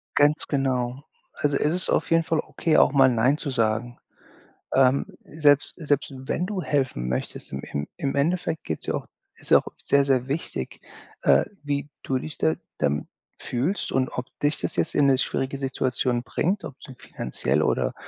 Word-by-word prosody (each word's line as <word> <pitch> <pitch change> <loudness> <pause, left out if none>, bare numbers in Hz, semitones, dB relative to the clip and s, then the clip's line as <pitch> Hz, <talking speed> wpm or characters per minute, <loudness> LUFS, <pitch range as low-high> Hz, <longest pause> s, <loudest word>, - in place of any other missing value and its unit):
Ganz 145 +1 +3
genau. 130 -2 -1 0.3
Also, 145 -1 0
es 150 +3 +1
ist 185 - +2
auf - - +1
jeden 165 0 +4
Fall 160 -1 0
okay, 160 0 0
auch - - +6
mal 135 -2 +6
nein 125 +5 +3
zu 145 - -4
sagen. 115 0 0 0.8
Ähm, 130 +1 +4 0.2
selbst 145 -2 +3
selbst 145 -3 -1
wenn 145 +7 -2
du 195 -3 -3
helfen 130 - -1
möchtest, 60 - -2
im 70 - -3
im 70 +1 -4
im 135 - -2
Endeffekt 160 +2 0
geht's 80 - -4
ja - - -1
auch - - -3 0.3
ist - - -4
auch - - +6 0.2
sehr, 140 0 +3
sehr 130 -1 +1
wichtig, 145 +5 -4 0.4
äh, - - +5 0.2
wie 145 0 -2
du 130 -1 0
dich 155 - -7
da 80 0 +2 0.2
dann 75 +1 0 0.3
fühlst 140 +12 -2
und 130 -1 +1
ob 125 - -4 0.2
dich 145 +1 +2
das - - -3
jetzt - - 0
in 145 - +4
'ne 135 -2 +4
schwierige 135 +1 -1
Situation 130 -2 0
bringt, 185 +10 -1
ob 135 - -8
zum 135 -4 -11
finanziell 65 - -1
oder - - +1
135 Hz, 180 wpm, -25 LUFS, 125-150 Hz, 0.8 s, auch